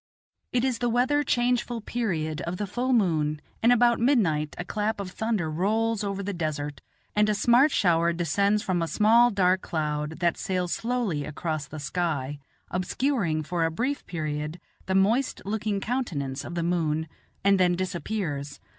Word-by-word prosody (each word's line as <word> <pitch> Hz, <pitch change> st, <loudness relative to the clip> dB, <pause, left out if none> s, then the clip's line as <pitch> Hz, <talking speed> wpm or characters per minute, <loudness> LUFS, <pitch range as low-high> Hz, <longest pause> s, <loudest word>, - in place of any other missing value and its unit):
It 250 Hz, 0 st, +1 dB
is 255 Hz, -3 st, 0 dB
the 240 Hz, -, +1 dB
weather 255 Hz, +5 st, +2 dB
changeful 245 Hz, -3 st, 0 dB
period 165 Hz, -10 st, -2 dB
of 175 Hz, +2 st, -4 dB
the 205 Hz, -, -2 dB
full 245 Hz, +6 st, -2 dB
moon, 160 Hz, -10 st, +2 dB, 0.2 s
and 235 Hz, -, +5 dB
about 240 Hz, -1 st, +4 dB
midnight 180 Hz, -, +2 dB
a 175 Hz, -, -4 dB
clap 210 Hz, +3 st, -1 dB
of 190 Hz, -2 st, -5 dB
thunder 220 Hz, -5 st, -1 dB
rolls 215 Hz, +7 st, 0 dB
over 200 Hz, 0 st, -3 dB
the 200 Hz, +1 st, -3 dB
desert, 150 Hz, -4 st, -3 dB, 0.3 s
and 210 Hz, 0 st, +3 dB
a 210 Hz, -, +2 dB
smart 240 Hz, +7 st, +5 dB
shower 170 Hz, -, +3 dB
descends 200 Hz, +5 st, +1 dB
from 180 Hz, -2 st, 0 dB
a 165 Hz, -, 0 dB
small 230 Hz, +6 st, +5 dB
dark 185 Hz, -3 st, +2 dB
cloud, 150 Hz, -1 st, -2 dB
that 170 Hz, -1 st, +1 dB
sails 180 Hz, -2 st, -1 dB
slowly 225 Hz, -11 st, -1 dB
across 155 Hz, 0 st, -3 dB
the 155 Hz, +2 st, -8 dB
sky, 145 Hz, -2 st, -2 dB, 0.3 s
obscuring 180 Hz, -, 0 dB
for 170 Hz, +2 st, -1 dB
a 165 Hz, -, +2 dB
brief 255 Hz, -, -2 dB
period 155 Hz, 0 st, -3 dB, 0.3 s
the 190 Hz, -, 0 dB
moist 220 Hz, +8 st, +2 dB
looking 210 Hz, 0 st, -1 dB
countenance 160 Hz, -, -2 dB
of 170 Hz, -, -7 dB
the 170 Hz, -, -1 dB
moon, 160 Hz, -2 st, 0 dB, 0.4 s
and 195 Hz, 0 st, +4 dB
then 180 Hz, -1 st, +4 dB
disappears. 175 Hz, -5 st, -3 dB
185 Hz, 165 wpm, -26 LUFS, 160-225 Hz, 0.4 s, and